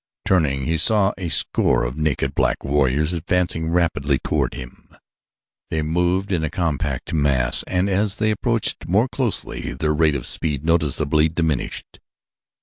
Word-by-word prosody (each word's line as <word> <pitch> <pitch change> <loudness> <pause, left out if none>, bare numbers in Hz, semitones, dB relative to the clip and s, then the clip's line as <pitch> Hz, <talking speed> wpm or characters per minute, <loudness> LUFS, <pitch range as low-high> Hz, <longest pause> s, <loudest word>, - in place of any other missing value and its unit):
Turning, 75 -8 +1
he 80 +4 -1
saw 105 +2 +3
a 90 -3 -5
score - - +2
of - - -3
naked, 75 -3 -1
black - - 0
warriors 75 +3 +1
advancing 85 -1 -1
rapidly 80 -5 +1
toward - - -2
him. 65 -1 -11 0.8
They 80 -1 -2
moved 90 +5 0
in 85 -4 0
a 80 - -1
compact 75 -6 -3
mass 70 -5 +3
and 90 +1 0
as 100 +1 0
they 110 -1 0
approached 115 +1 -1
more 105 +8 +2
closely 125 -5 -1
their 75 -1 -1
rate 75 -1 +2
of 65 - -4
speed 75 -3 0
noticeably 75 -2 +2
diminished. 80 -4 -3
80 Hz, 145 wpm, -21 LUFS, 70-90 Hz, 0.8 s, saw